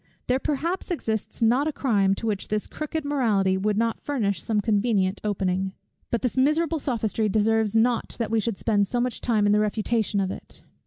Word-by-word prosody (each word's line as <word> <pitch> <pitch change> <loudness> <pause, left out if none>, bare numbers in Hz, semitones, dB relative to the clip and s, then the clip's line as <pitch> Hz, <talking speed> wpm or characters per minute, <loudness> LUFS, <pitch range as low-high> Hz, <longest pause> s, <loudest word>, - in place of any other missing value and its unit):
There 255 +1 +1
perhaps 330 +7 -2
exists 225 - -2
not 250 +6 +3
a - - 0
crime, 205 -9 +2
to 225 - -6
which 210 -3 -2
this 210 0 -1
crooked 305 0 -4
morality 215 -10 +2
would 205 +2 0
not 230 0 0
furnish 205 - -1
some 220 -2 0
convenient 205 -2 +1
opening. 190 -2 -1 0.4
But 235 - -1
this 250 - 0
miserable 310 +4 +2
sophistry 225 -5 0
deserves 220 +1 +2
not 230 +1 +2
that 225 -2 -2
we 225 - +3
should 220 -2 -2
spend 205 -3 +1
so 245 - -1
much 250 0 -2
time 220 -4 +2
in 205 - +4
the 210 - +4
refutation 215 0 0
of 190 -1 0
it. - - -8
220 Hz, 195 wpm, -25 LUFS, 205-250 Hz, 0.4 s, in